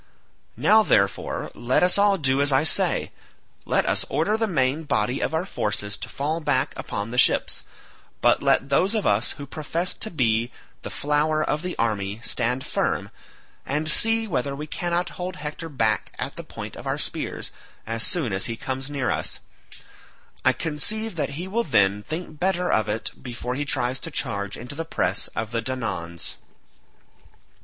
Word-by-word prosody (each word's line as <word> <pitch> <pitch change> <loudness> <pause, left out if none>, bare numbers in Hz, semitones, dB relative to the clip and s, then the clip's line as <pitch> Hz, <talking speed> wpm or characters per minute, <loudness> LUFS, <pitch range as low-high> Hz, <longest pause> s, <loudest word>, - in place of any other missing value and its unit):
Now, 220 +1 +6
therefore, 100 - +1
let 125 +6 +2
us 180 - +4
all 200 -1 +4
do 135 -4 +2
as 145 0 +3
I 135 +2 +4
say; 160 - +2 0.5
let - - +2
us - - +1
order 210 - +1
the 225 0 +1
main 140 -4 +1
body 125 -4 +1
of - - 0
our 160 +3 0
forces 105 - -1
to - - -6
fall 150 +4 -1
back 140 -3 +1
upon 105 +3 -4
the 125 - +1
ships, - - +4 0.6
but - - +4
let 140 - +3
those 185 +10 +3
of 215 - 0
us 105 +3 +2
who 145 - -8
profess 160 +5 -2
to 220 - -5
be 120 - +1 0.3
the - - -6
flower 150 +1 +1
of 150 - 0
the 180 0 -4
army 105 -2 -1
stand 125 +2 0
firm, - - -1 0.5
and 150 +3 0
see 225 +4 +3
whether 140 - -1
we 150 +2 -5
cannot 175 +2 -1
hold 180 +1 -3
Hector 150 +2 -5
back 110 -7 +1
at - - -3
the - - -6
point - - -8
of - - -8
our - - 0
spears - - -4 0.3
as 115 +1 -2
soon 135 - +1
as 95 - +3
he 115 - -2
comes 135 +2 -4
near 140 -3 0
us; - - -1 1.0
I - - +6
conceive 210 +8 -1
that 150 -3 -2
he 180 +3 -4
will 230 +5 0
then 100 - +3
think 155 +4 -6
better 180 -1 +1
of 110 -1 +2
it 110 +2 -2
before 125 -1 -4
he 145 +3 -2
tries 130 -2 0
to - - -6
charge 100 0 -1
into 125 +4 -7
the 165 +3 -3
press 95 - -1
of 110 0 -3
the 115 -1 0
Danaans." 110 -10 -4
140 Hz, 180 wpm, -25 LUFS, 115-165 Hz, 1.0 s, Now